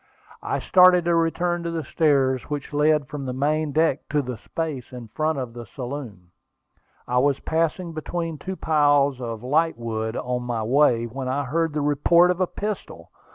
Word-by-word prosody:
I - - -2
started 180 -2 +5
to 170 - +2
return 175 +1 +1
to 170 - -3
the 165 -1 -3
stairs 135 -4 +1
which 145 0 -5
led 150 -1 +2
from 145 0 -6
the 125 - -3
main 150 +3 0
deck 155 -2 +2
forward 145 -2 0
to 125 - -4
the 120 - -6
space 150 -3 -5
in 120 -3 -9
front 155 +5 -1
of 125 -3 -5
the 120 -2 -9
saloon. 120 -8 -7 0.8
I 125 0 +2
was 140 +1 +2
passing 165 +2 -1
between 165 0 -4
two 190 +5 -5
piles 145 -4 +2
of 115 -2 -5
lightwood 120 -6 -1
on 125 0 -2
my 120 -2 -3
way, 120 -1 +3
when 130 +3 -5
I 135 +3 -1
heard 160 +4 -1
the 150 - -1
report 170 +5 +4
of 180 +1 -3
a 185 - +2
pistol. 210 +3 -6
145 Hz, 185 wpm, -24 LUFS, 125-165 Hz, 0.8 s, started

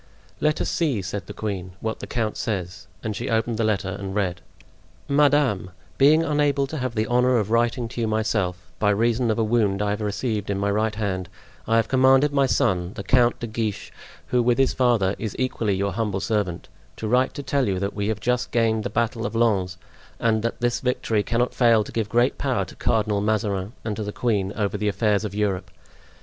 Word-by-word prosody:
"Let 150 0 +1
us - - -1
see," 140 - 0
said 95 0 -5
the - - -7
queen, 95 -4 -4
"what 110 +2 -3
the - - -7
count 110 -3 -2
says." 90 -6 -4 0.2
And 110 -2 -3
she - - -4
opened 115 0 0
the - - +2
letter 105 -3 0
and 95 -1 -5
read: 90 -4 -1 0.7
"Madame,—Being 140 - +2
unable 145 -3 +1
to 155 +3 -6
have 125 -2 -3
the 110 0 +1
honor 125 +2 +3
of 110 -1 -1
writing 120 +1 +1
to 120 - -5
you 115 - +1
myself, 105 -5 -1
by 105 - +3
reason 115 +3 +2
of 110 - +1
a 115 - +2
wound 105 -3 +1
I 105 0 0
have 105 +1 -3
received 105 0 -2
in 100 - 0
my 100 +1 0
right 105 +1 0
hand, 95 -4 -2 0.4
I 115 - +2
have 115 -1 +3
commanded 135 +2 +4
my 140 -1 +3
son, 90 -5 +1
the 100 - -5
Count 120 +4 +3
de - - -2
Guiche, 110 -2 -3 0.4
who, 125 0 +3
with 120 0 +2
his 135 -2 +3
father, 120 -7 +2
is 110 -3 -4
equally 115 -6 0
your 100 +1 -1
humble 105 -4 -1
servant, 100 -5 -2 0.3
to 110 - -4
write 125 +4 +2
to 145 - -5
tell 135 -1 0
you 95 -2 0
that 100 +2 -2
we 100 0 -2
have 110 -1 -1
just 125 +1 0
gained 110 -2 +1
the - - -2
battle 115 0 -1
of 105 +2 -3
Lens, 100 -6 +1 0.4
and 110 -1 +2
that 115 +1 -3
this 120 0 +1
victory 120 -4 0
cannot 120 +3 0
fail 115 -3 +4
to - - -10
give 110 -2 -2
great 120 +5 +2
power 125 -8 0
to - - -12
Cardinal 105 -2 +1
Mazarin 105 -1 -1
and 110 -2 -2
to 110 - -2
the 105 - -4
queen 105 -5 0
over 105 -1 -1
the 105 - -1
affairs 105 +1 +1
of 105 -2 -5
Europe. 100 -3 -1
110 Hz, 215 wpm, -24 LUFS, 100-120 Hz, 0.7 s, commanded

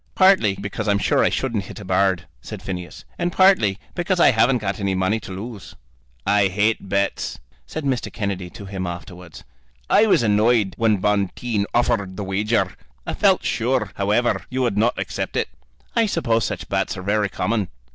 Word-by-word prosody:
"Partly 185 - +5
because 105 +2 -5
I'm 100 -1 +3
sure 95 - +2
I - - +4
shouldn't 115 -7 -2
hit - - -9
a 100 - -9
bird," 95 -1 +1 0.2
said - - -8
Phineas, 90 -2 -6
"and 175 0 0
partly 185 - +4 0.2
because 175 +1 -1
I 155 - +7
haven't 125 +2 +3
got 100 -3 -3
any 100 -1 0
money 95 +4 +1
to 100 - -10
lose." 95 -4 -8 0.5
"I 100 0 +4
hate 105 +1 0
bets," 100 0 -1 0.3
said 155 - -5
Mr. 135 -3 -1
Kennedy 100 -5 -3
to 100 - -10
him 95 -2 -4
afterwards. 85 0 -9 0.5
"I 220 - +6
was 165 - +4
annoyed 105 -1 +3
when 110 -2 +2
Bonteen 105 +2 0
offered 100 -5 0
the 105 - -3
wager. 95 -1 0 0.3
I - - -3
felt - - +3
sure, 115 -3 0
however, 105 +5 +1
you 130 0 -1
would 120 -5 0
not 110 +4 +2
accept - - -4
it." - - 0 0.5
"I 230 -1 +3
suppose 115 - +1
such - - -4
bets - - -1
are 90 - -6
very 105 +1 +1
common." 105 +2 -1
105 Hz, 180 wpm, -22 LUFS, 95-120 Hz, 0.5 s, I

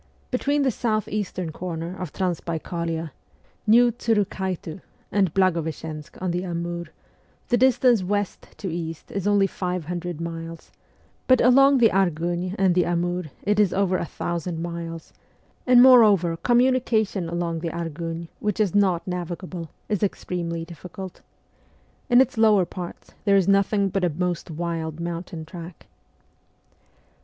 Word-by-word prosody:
Between 285 +3 +1
the 265 - +2
south 215 -2 -1
eastern 185 -5 -3
corner 170 +1 -5
of 180 -5 -6
Transbaikalia 170 -2 -3 0.6
(New 240 +3 +6
Tsurukhaitu) 190 -7 -2 0.3
and 195 -5 +2
Blagoveschensk 160 -4 -1
on 185 -1 -1
the 175 +1 -2
Amur, 170 -1 -3 0.6
the 240 - +3
distance 245 -3 +4
west 205 +1 -2
to 195 - -5
east 165 -2 -6
is 195 0 -2
only 205 -1 +4
five 180 -3 -3
hundred 175 -1 -4
miles; 165 0 -7 0.6
but 255 -2 +6
along 275 +3 +6
the 235 -3 +6
Argun 175 0 0
and 190 -2 +3
the 180 0 +3
Amur 175 +1 -1 0.2
it 210 +1 +1
is 200 -4 +3
over 190 -1 +2
a - - -3
thousand 170 0 -4
miles, 170 -1 -6 0.5
and 250 -1 +8
moreover 210 -10 +6
communication 240 -5 +2
along 170 -1 -2
the 165 0 -3
Argun, 165 0 -5
which 210 0 -2
is 205 -5 +2
not 190 -4 +2
navigable, 175 -1 -5 0.2
is 210 -3 -1
extremely 170 -4 -2
difficult. 180 +2 -9 0.9
In 245 +1 +7
its 235 -3 0
lower 210 -4 +5
parts 175 0 -8
there 200 -1 +5
is 190 -2 +2
nothing 200 0 +3
but 195 0 -1
a 180 - +3
most 175 +2 -2
wild 165 -1 -4
mountain 170 -1 -5
track. 170 0 -10
180 Hz, 140 wpm, -24 LUFS, 170-205 Hz, 0.9 s, and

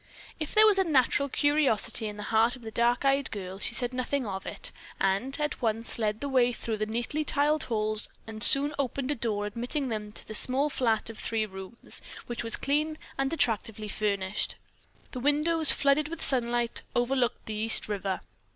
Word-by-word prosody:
If 310 - -5
there 430 0 +8
was 415 -2 +7
a - - +4
natural 280 -3 +2
curiosity 265 -6 +1
in 210 0 -7
the 210 - -6
heart 225 +3 +3
of 250 - -15
the 220 - -7
dark 240 +4 +1
eyed 275 0 +2
girl, 190 -2 -7
she - - 0
said 245 0 0
nothing 255 +1 -2
of 190 -2 -6
it, - - -3 0.3
and 200 +9 0
at 295 -1 -3
once 225 0 -1
led 215 -1 -1
the 285 - -3
way 255 -3 +2
through 230 -2 -4
the 215 0 -2
neatly 240 +7 -2
tiled 300 +1 +1
halls 215 -2 0 0.2
and 220 0 -5
soon 285 +4 +6
opened 275 +1 -2
a - - 0
door 215 -4 -2
admitting 245 +6 -4
them 210 -2 -5
to - - -7
a - - -7
small 265 +6 +3
flat 225 -4 +1
of 225 - -11
three 225 -1 -1
rooms, 190 +3 -6 0.2
which 240 -1 -5
was 230 - +5
clean 305 +3 -1 0.2
and 270 +1 0
attractively 225 -7 0
furnished. 200 -1 -1 0.6
The 255 - -6
windows, 300 +4 +4
flooded 280 +1 +2
with 330 +1 -5
sunlight, 240 -2 +1
overlooked 245 0 0
the 220 - -5
East 220 +2 +3
River. 195 -2 -3
240 Hz, 190 wpm, -28 LUFS, 215-280 Hz, 0.6 s, there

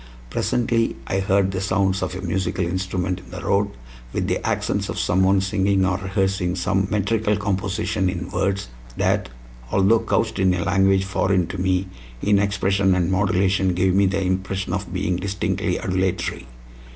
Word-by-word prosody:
Presently 115 - 0
I 95 - -1
heard 95 0 +2
the 95 -1 -3
sounds 95 0 +1
of - - -3
a 95 - -5
musical 90 0 -1
instrument 95 0 -2
in - - -16
the - - -7
road, 100 +1 +2 0.4
with - - -1
the - - -1
accents - - -1
of - - -4
someone 95 +1 +3
singing 95 -1 +1
or 90 -1 +1
rehearsing 95 -2 0
some 95 +1 0
metrical 105 0 +1
composition 100 0 -1
in 90 -1 -5
words 95 -5 -1 0.3
that, - - +1 0.4
although 100 +4 +4
couched 110 -2 -1
in 95 -1 +3
a 85 - -1
language 95 0 +3
foreign 95 -1 +1
to - - -5
me, 95 0 +1 0.3
in 100 +5 +3
expression 100 -1 +2
and 90 0 +1
modulation 95 -1 +2
gave 90 +1 +2
me 100 +1 +4
the 95 +1 0
impression 95 +1 -2
of - - -3
being 90 - -1
distinctly 95 0 -1
adulatory. 95 -7 -2
95 Hz, 165 wpm, -22 LUFS, 95-100 Hz, 0.4 s, although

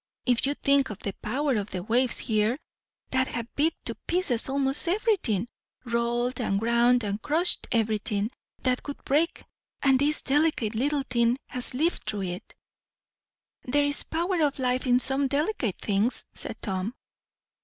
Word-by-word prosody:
If 250 +1 +3
you 285 - 0
think 280 -1 +2
of 210 - -6
the 200 -1 -4
power 265 +3 0
of 205 0 -3
the 180 -1 -4
waves 240 +4 +2
here, 220 +2 +1 0.5
that 260 0 +2
have 235 0 -5
beat 320 +3 +2
to - - +1
pieces 290 -10 +2
almost 275 +3 +2
everything 355 - +1 0.4
rolled 240 +1 0
and 195 -4 0
ground 235 +2 +3
and 205 +1 -2
crushed 325 +7 +1
everything 215 -1 0 0.3
that 255 -1 +1
would 285 - -6
break 310 +5 +1 0.4
and 270 -2 +5
this 295 +2 +2
delicate 285 -6 +1
little 280 +5 0
thing 240 -1 +1
has 250 -1 -4
lived 325 +6 +1
through 205 -2 -2
it." 180 -1 -6 1.1
"There 290 +3 +1
is 285 0 +4
a - - -2
power 340 +2 0
of 290 -2 +1
life 255 0 0
in 245 0 +5
some 270 +2 0
delicate 280 - -1
things," 210 +4 0
said - - -3
Tom. 195 +3 -2
250 Hz, 160 wpm, -27 LUFS, 225-285 Hz, 1.1 s, and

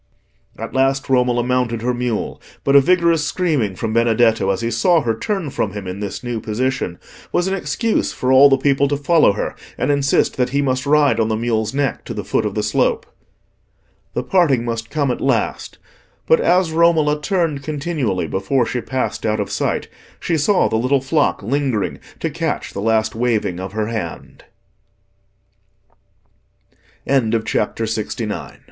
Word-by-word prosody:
At - - -6
last 135 +1 +1
Romola 125 -2 +2
mounted 125 -2 -1
her 125 +1 +1
mule, 120 -2 -3 0.2
but 140 - +2
a 140 - +9
vigorous 170 0 +3
screaming 150 - 0
from 110 +3 -3
Benedetto 115 -3 +3
as 95 +1 0
he 115 0 -1
saw 165 +9 +3
her 115 -4 0
turn 185 - -3
from 100 -5 -2
him 105 -2 -6
in 90 +1 -5
this 100 +4 -5
new 120 -2 -3
position, 115 -4 -2 0.3
was 175 - +1
an 190 - -1
excuse 195 +5 -1
for 130 - -1
all 135 +2 +8
the 135 - +4
people 140 0 +2
to 145 0 -1
follow 150 -5 +4
her - - -3 0.2
and 130 - +1
insist 140 -1 +1
that 125 -1 +1
he 140 +2 0
must 130 -1 0
ride 145 -5 +3
on 110 - +2
the 110 - 0
mule's 110 -1 -1
neck 140 -1 -1
to - - -6
the - - -4
foot - - 0
of - - -6
the - - -1
slope. 485 -3 +1 1.1
The - - -1
parting 145 -11 +2
must 115 -1 -4
come 145 -4 0
at - - -4
last, 130 -5 -1 0.5
but 160 - +4
as 180 -1 +2
Romola 160 -2 +3
turned 165 -4 0
continually 140 - -2
before 95 - 0
she 125 +1 -3
passed 130 +1 -3
out 110 -1 0
of 100 - -3
sight, - - -1 0.3
she 170 - -1
saw 180 +6 +3
the 110 - 0
little 130 +4 +1
flock 145 -3 0
lingering 125 -4 -1 0.2
to - - -1
catch - - -3
the 100 - -4
last 110 0 +1
waving 110 -6 -1
of 95 +1 -6
her 110 0 -1
hand. 110 -7 -6 2.6
CHAPTER 115 -4 0
LXX. 110 0 -3
Meeting 110 -2 -2
Again. - - -7
125 Hz, 175 wpm, -19 LUFS, 110-145 Hz, 2.6 s, a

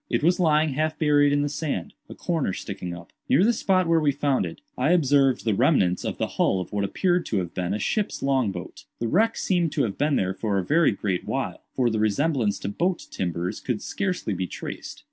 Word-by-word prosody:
It - - 0
was 175 +3 +3
lying 155 -2 +3
half 155 +3 -1
buried 145 -2 +4
in 145 0 +2
the - - 0
sand, 145 - -3 0.2
a - - -8
corner 160 - -1
sticking 90 -3 -5
up. 85 - -14 0.2
Near 145 +8 +5
the 235 +3 +4
spot 185 -4 +1
where 165 0 +4
we 150 -2 +2
found 140 -7 0
it, 80 - -9 0.2
I 145 +7 +2
observed 140 -7 +3
the 110 - +2
remnants 100 - +2
of - - -3
the - - 0 0.2
hull 95 - +3
of 90 - -6
what 100 -1 0
appeared 175 - +1
to 110 - -1
have 90 -3 -3
been 90 -1 -2
a 105 - 0
ship's 210 - -1
long 135 -6 +2
boat. 90 -2 -9
The 115 - -2
wreck 220 - +2
seemed 175 -4 +1
to 150 -4 +1
have 105 -5 -3
been 145 0 +2
there 95 0 0
for 105 0 -1
a 95 - -1
very 165 +2 +4
great 100 -3 -2
while; - - -3
for 125 -3 +2
the 110 - -1
resemblance 110 0 +1
to - - -4
boat 175 - -1
timbers 90 0 -3
could 120 -5 -3
scarcely 180 - -2
be 90 0 -2
traced. - - -7
135 Hz, 230 wpm, -25 LUFS, 100-160 Hz, 0.2 s, Near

